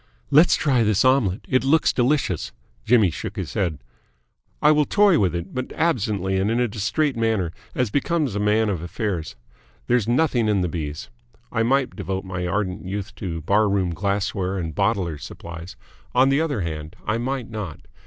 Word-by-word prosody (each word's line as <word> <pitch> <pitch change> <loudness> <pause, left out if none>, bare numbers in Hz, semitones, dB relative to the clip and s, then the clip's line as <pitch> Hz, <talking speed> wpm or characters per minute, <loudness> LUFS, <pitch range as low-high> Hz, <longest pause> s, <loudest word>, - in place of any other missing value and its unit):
"Let's 155 +5 +6
try 135 -5 +2
this 105 +1 +2
omelette. 125 -5 +2
It 130 -1 +2
looks 150 +4 +3
delicious." 125 - 0 0.3
Jimmy 110 -6 +4
shook - - -6
his - - -5
head. 85 -6 -1 0.8
"I - - +5
will 150 -1 +3
toy 200 -2 +4
with 90 -4 +1
it 85 +2 -5
but 130 0 -4
absently 105 - 0
and 100 +2 +1
in 115 +2 +1
a 125 - +2
distrait 120 +7 -1
manner, 110 -7 0 0.2
as 125 -5 0
becomes 150 - 0
a 105 - -2
man 105 +2 +2
of 90 -6 -2
affairs. 90 -1 -3 0.5
There's 120 -3 +1
nothing 120 -2 +2
in 105 -3 +2
the 90 - +1
B's. 80 +3 -5 0.4
I 115 - 0
might 130 +3 +1
devote 95 -1 -4
my 95 -1 -3
ardent 95 0 -2
youth 100 +1 -5
to 85 -4 -4
Bar 100 +6 +2
Room 95 -3 0
Glassware 100 +1 -1
and 80 -3 -3
Bottlers' 85 -2 0
Supplies. 85 +1 -9 0.4
On 130 +2 +5
the 140 +3 +3
other 145 -10 -1
hand, 80 -1 -5
I 110 +2 0
might 125 -1 -3
not. 105 -7 -6
105 Hz, 180 wpm, -23 LUFS, 90-125 Hz, 0.8 s, Let's